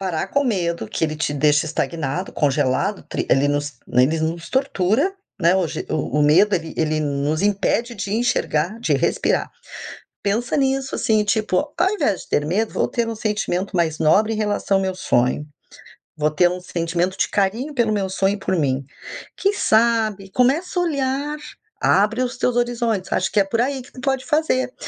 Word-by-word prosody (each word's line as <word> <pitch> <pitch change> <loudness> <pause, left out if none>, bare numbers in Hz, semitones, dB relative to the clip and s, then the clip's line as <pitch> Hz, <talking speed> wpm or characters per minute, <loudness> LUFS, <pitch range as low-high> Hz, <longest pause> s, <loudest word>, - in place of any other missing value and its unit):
parar 180 -5 -2
com 280 - +1
o - - -4
medo, 170 - -1
que - - -5
ele 155 -1 -2
te 150 -1 -1
deixe 150 +2 +3
estagnado, 160 +2 -3
congelado, 145 +7 0
tri - - -3
ele 140 +1 +3
nos 145 0 -1 0.2
ele 140 +6 +3
nos 165 +2 -3
tortura, 265 - +1 0.3
né, 175 +2 +4
o 185 -2 +1
je - - -5
o 150 -1 -1
o - - +4
medo, 185 +8 +5
ele 165 -2 -3
ele 155 -1 0
nos 145 +2 -1
impede 205 +4 0
de 200 0 -4
enxergar, 215 -5 0
de - - 0
respirar. - - 0 0.7
Pensa 225 +4 0
nisso 270 -1 0
assim, 215 -1 +2
tipo: 210 -3 +1 0.2
"Ao 380 - +3
invés 210 - 0
de - - -17
ter 145 - +1
medo, 210 +7 0
vou - - 0
ter 235 -2 -1
um 230 - -3
sentimento 205 -3 -2
mais 160 -3 +1
nobre 210 +8 +3
em - - -2
relação 205 -2 0
ao 195 - -1
meu 190 0 -1
sonho. 130 -4 0 0.7
Vou 150 -1 +1
ter 175 +3 +3
um 180 0 -5
sentimento 175 +1 -2
de - - +1
carinho 220 +9 0
pelo 235 -4 +1
meu 200 -2 0
sonho 195 +1 +1
e - - -9
por 190 -1 -1
mim". 135 -4 0 0.5
Quem 395 - +2
sabe, 220 - +2
começa 285 - +1
a 355 - +2
olhar, 285 -1 -1 0.4
abre 215 +5 +3
os 255 0 -2
teus 250 -1 0
horizontes, 235 -5 -1
acho 190 - +1
que - - +4
é - - +5
por 195 +4 -2
aí 270 +1 -1
que 250 - -16
tu 255 - -12
pode 270 -1 0
fazer, 300 -5 +1
195 Hz, 195 wpm, -21 LUFS, 160-240 Hz, 0.7 s, medo